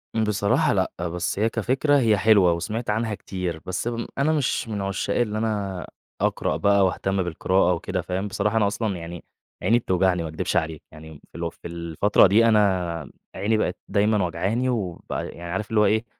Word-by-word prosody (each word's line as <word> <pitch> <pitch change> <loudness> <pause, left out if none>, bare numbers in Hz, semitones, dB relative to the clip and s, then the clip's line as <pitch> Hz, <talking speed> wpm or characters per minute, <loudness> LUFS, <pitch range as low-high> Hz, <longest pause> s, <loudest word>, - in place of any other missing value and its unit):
بصراحة 105 -2 +2
لأ، - - 0 0.2
بس 85 +2 -3
هي 110 +2 +2
كفكرة 135 +6 +2
هي 110 -4 +3
حلوة، 100 -4 +5
وسمعت 105 +8 -4
عنها 110 0 0
كتير، 90 -5 -5
بس 95 +5 -3
امم 115 -1 -3
أنا 145 +3 +2
مش 140 -5 0
من 105 -3 -3
عشاق 100 +1 -2
اللي 110 -3 0
أنا 100 -5 -2 0.3
أقرأ - - 0
بقى 100 -1 +4
واهتم 95 +1 0
بالقراءة 90 +2 +1
وكده، 90 +2 -3
فاهم، 95 +4 -3
بصراحة 105 +2 -1
أنا 105 -2 +3
أصلًا 105 -1 -2
يعني 85 0 -8 0.4
عيني 115 +2 +4
بتوجعني، 95 -4 +1
ما 80 - -4
أكدبش 80 - -3
عليك، 80 -2 -2
يعني 80 -1 -12
اللي 85 0 -3
هو 85 - -1
في - - -11
الفترة 85 +5 +3
دي 110 +5 +4
أنا 95 -8 +1 0.2
عيني 110 +2 +1
بقت 90 -4 -1
دايمًا 105 -1 +2
وجعاني 95 +10 -1
وبقى 100 -9 -3
يعني 85 0 -8
عارف 100 +4 -3
اللي 110 - +2
هو - - +5
إيه، 110 +2 +2
100 Hz, 185 wpm, -24 LUFS, 90-110 Hz, 0.4 s, حلوة